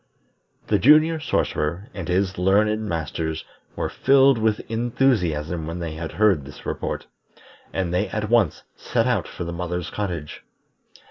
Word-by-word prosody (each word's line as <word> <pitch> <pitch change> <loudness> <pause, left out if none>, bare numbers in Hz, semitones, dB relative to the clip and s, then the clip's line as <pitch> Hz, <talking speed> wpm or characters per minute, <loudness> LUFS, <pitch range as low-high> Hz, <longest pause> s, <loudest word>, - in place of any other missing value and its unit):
The 105 - +2
Junior 155 +5 +5
Sorcerer 95 - -1
and 95 -4 -6
his 90 +1 0
learned 105 +3 +2
Masters 80 -1 -3 0.3
were - - -1
filled 135 -2 +4
with 110 -1 +1
enthusiasm 90 - 0
when 85 +1 -4
they 85 -3 -4
heard 85 +1 +1
this 70 +2 -12
report, - - -3 0.7
and 90 -2 -2
they 95 +4 +1
at 105 +1 -2
once 110 -7 +2
set - - 0
out - - +1
for - - -6
the 85 0 -5
mother's 90 0 -4
cottage. 85 -7 -4
95 Hz, 140 wpm, -23 LUFS, 85-110 Hz, 0.7 s, Junior